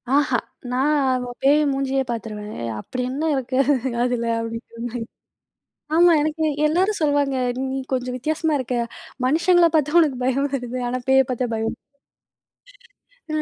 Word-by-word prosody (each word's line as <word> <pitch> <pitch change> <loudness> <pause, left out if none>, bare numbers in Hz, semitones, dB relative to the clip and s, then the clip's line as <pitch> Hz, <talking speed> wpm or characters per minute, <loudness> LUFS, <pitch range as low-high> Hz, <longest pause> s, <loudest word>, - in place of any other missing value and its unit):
ஆஹா. 270 -4 +3 0.3
நான் 270 +4 +2 0.3
ஆ, - - -6
பேய் 290 +2 +5
மூஞ்சியையே 270 0 0
பாத்துருவேன். 215 -2 -5 0.3
அப்படி 250 - -5
என்ன 280 +5 -3
இருக்கு 260 0 -2 0.5
அதுல 245 -1 0
அப்படிங்கிற 230 0 -6
மாரி. 240 0 -5 1.0
ஆமா, 345 0 +6
எனக்கு 310 +1 -1 0.2
எல்லாரும் 375 +7 +1
சொல்லுவாங்க. 285 -3 +2 0.2
"நீ 265 0 -2
கொஞ்சம் 250 0 -1
வித்தியாசமா 310 +4 -1
இருக்க. 250 -1 -2 0.5
மனுஷங்கள 340 +4 +4
பாத்தா 305 +2 +2
உனக்குப் 275 -6 +1
பயம் 275 +2 +1
வருது. 250 -1 -3
ஆனா, 255 +1 -2
பேயைப் 265 -1 +5
பாத்தா 250 0 -1
பயம் 225 0 -1 1.6
இல்ல". 305 - +1
265 Hz, 135 wpm, -22 LUFS, 250-300 Hz, 1.6 s, ஆமா